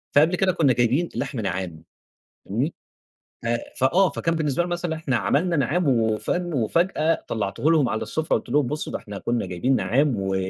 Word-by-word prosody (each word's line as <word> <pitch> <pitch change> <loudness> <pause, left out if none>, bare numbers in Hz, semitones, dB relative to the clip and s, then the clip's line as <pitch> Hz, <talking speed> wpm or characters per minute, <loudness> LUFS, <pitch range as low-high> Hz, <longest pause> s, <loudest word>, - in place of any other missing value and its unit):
فقبل 155 +5 +5
كده 185 +1 +2
كنا 160 -7 +3
جايبين 125 +8 +1
لحم 125 +1 -3
نعّام 90 -5 -4 0.6
فاهمني، 125 - -2 0.7
ف - - -6 0.3
فآه 175 +9 +4
فكان 165 - -1
بالنسبة 155 -1 0
لهم 175 - -4
مثلًا 175 -2 -2
إحنا 145 -6 -1
عملنا 165 - +1
نعّام 150 +4 +1
وفاهم، 125 +9 0
وفجأة 165 - +1
طلعته 105 +7 -1
لهم 155 -6 +4
على 110 0 -2
السُفرة 160 0 0
قلت - - -6
لهم 140 +2 +2
بُصّوا 150 +5 -4
ده - - -2
إحنا 100 -1 -8
كنا 120 +4 -1
جايبين 125 +10 0
نعّام 135 +3 +2
و 95 0 -1
140 Hz, 175 wpm, -24 LUFS, 115-165 Hz, 0.7 s, فقبل